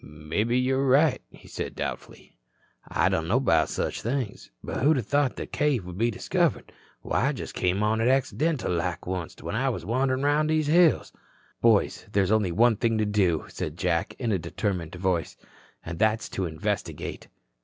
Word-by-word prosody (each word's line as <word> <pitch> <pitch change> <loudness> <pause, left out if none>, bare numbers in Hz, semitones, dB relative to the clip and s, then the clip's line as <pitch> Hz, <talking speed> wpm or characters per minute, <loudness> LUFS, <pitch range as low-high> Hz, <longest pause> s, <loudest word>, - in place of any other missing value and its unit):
"Mebbe 75 +9 -3
you're 130 +2 +2
right," 145 +4 +4
he - - -17
said - - -5
doubtfully. - - -6 0.5
"I - - +1
don't 80 0 0
know 115 +8 +3
'bout 80 -12 +3
such - - -2
things. 120 -3 -3
But - - -4
who'da 140 -2 +3
thought 145 +3 +1
that - - -7
cave 145 -10 +1
would 90 +1 -8
be 115 +1 +3
discovered. 105 - -1 0.3
Why, - - +1
I - - +1
just - - -7
come 90 +3 0
on 110 +1 +1
it 115 - +2
accidental 135 - +1
like 85 +1 -2
onct 90 -3 -5
when - - -4
I 135 +4 +1
was 90 -9 -4
wanderin' 130 +4 0
through 150 +2 +2
these 155 -1 +1
hills." 165 +2 +3 0.5
"Boys, 115 -3 +2
there's 100 -1 +2
only 105 -5 +2
one 115 +4 +4
thing 115 +1 +1
to 110 - +1
do," 95 -6 +1
said - - -5
Jack - - -1
in 115 - -1
a 95 - +1
determined 90 0 -3
voice, 90 -3 -1 0.5
"and 80 0 -6
that's 110 +1 +1
to 95 -2 -2
investigate." 80 -1 -4
110 Hz, 180 wpm, -26 LUFS, 90-130 Hz, 0.5 s, right